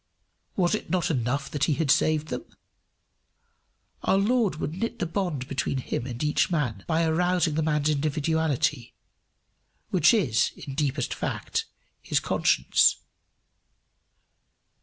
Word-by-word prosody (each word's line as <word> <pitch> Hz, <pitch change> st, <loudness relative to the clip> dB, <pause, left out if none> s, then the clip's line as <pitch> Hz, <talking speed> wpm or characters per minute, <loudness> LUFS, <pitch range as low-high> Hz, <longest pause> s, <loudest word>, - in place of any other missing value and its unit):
Was 180 Hz, -1 st, +2 dB
it 215 Hz, -, -3 dB
not 180 Hz, -3 st, +1 dB
enough 140 Hz, +1 st, -1 dB
that 145 Hz, -1 st, +1 dB
he 155 Hz, -, +1 dB
had 155 Hz, -3 st, +1 dB
saved 155 Hz, -1 st, +2 dB
them? -, -, -4 dB, 1.6 s
Our 195 Hz, -, +2 dB
Lord 220 Hz, -1 st, +2 dB
would 155 Hz, 0 st, -4 dB
knit 230 Hz, +6 st, -3 dB
the -, -, -1 dB
bond 165 Hz, -7 st, -2 dB
between 140 Hz, 0 st, -2 dB
him 125 Hz, -1 st, -3 dB
and 125 Hz, +2 st, -5 dB
each 150 Hz, 0 st, +2 dB
man 125 Hz, -, -1 dB
by 165 Hz, 0 st, +1 dB
arousing 175 Hz, 0 st, +1 dB
the 160 Hz, -, 0 dB
man's 150 Hz, -1 st, +1 dB
individuality, 150 Hz, -3 st, 0 dB, 1.0 s
which 175 Hz, -3 st, +5 dB
is, 150 Hz, -, +2 dB
in 140 Hz, -, -8 dB
deepest 140 Hz, -2 st, -1 dB
fact, -, -, -3 dB, 0.4 s
his -, -, 0 dB
conscience. 65 Hz, -, +3 dB
155 Hz, 130 wpm, -26 LUFS, 140-175 Hz, 1.6 s, which